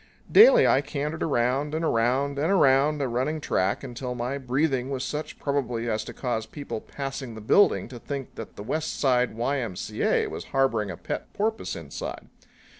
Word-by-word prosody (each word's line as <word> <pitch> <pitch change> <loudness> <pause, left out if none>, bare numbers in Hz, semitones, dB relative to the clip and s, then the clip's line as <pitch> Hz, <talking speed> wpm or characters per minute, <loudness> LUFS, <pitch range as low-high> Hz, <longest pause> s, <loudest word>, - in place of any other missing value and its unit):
Daily 485 +2 +8
I 135 - +4
cantered 145 +2 -4
around 140 +2 +1
and 165 +1 -1
around 135 +3 +1
and 160 +6 +1
around 145 -4 +4
a - - 0
running 130 +6 -1
track 95 -7 0
until 125 -1 -5
my 125 +3 -3
breathing 130 0 0
was 130 -2 -2
such 150 +2 -4
probably 125 -5 -2
as 110 -1 -1
to - - -7
cause 115 -4 -3
people 145 -7 -6
passing 135 -4 -6
the - - -7
building 105 - +4
to 120 -2 -9
think 140 +1 -6
that 115 - -9
the 105 - -7
West 155 +8 -3
Side 125 -4 +2
Y.M.C.A. 115 -5 0
was - - -6
harboring 115 -7 +1
a 85 - -6
pet 90 - -5
porpoise 220 +2 -1
inside. - - -7
135 Hz, 175 wpm, -26 LUFS, 120-145 Hz, -, Daily